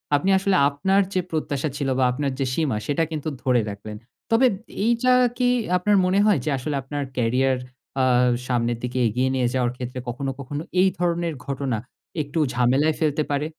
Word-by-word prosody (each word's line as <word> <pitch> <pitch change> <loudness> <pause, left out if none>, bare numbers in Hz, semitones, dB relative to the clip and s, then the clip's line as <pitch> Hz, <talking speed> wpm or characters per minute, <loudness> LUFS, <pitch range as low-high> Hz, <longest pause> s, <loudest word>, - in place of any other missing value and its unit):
আপনি 165 +7 +1
আসলে 195 0 +1
আপনার 190 +8 +2
যে 185 - +1
প্রত্যাশা 150 -2 -2
ছিল 140 -2 -1
বা 130 - +2
আপনার 140 +1 -2
যে 135 - +1
সীমা, 145 -8 0
সেটা 145 +3 +1
কিন্তু 155 0 -3
ধরে 125 -3 +3
রাখলেন। 105 +1 -7 0.3
তবে 240 +3 +5 0.4
এইযা 240 +2 +3 0.2
কি 250 -1 +2 0.3
আপনার 205 +3 +2
মনে 190 +2 +2
হয় 205 -9 +4
যে - - 0
আসলে 140 +3 -3
আপনার 145 +2 -4
career 130 +3 +2 0.5
আ - - +3 0.4
সামনের 120 -2 0
দিকে 125 +1 -3
এগিয়ে 125 +4 0
নিয়ে 125 -2 +1
যাওয়ার 125 -2 +1
ক্ষেত্রে 125 0 -5
কখনো, 135 +3 -3
কখনো 145 +2 -5 0.2
এই 190 - +5
ধরনের 170 -2 0
ঘটনা 135 -4 -2 0.4
একটু 145 +3 -3
ঝামেলায় 130 +6 +2
ফেলতে 155 -1 +1
পারে? 145 +1 0
140 Hz, 175 wpm, -23 LUFS, 125-165 Hz, 0.5 s, তবে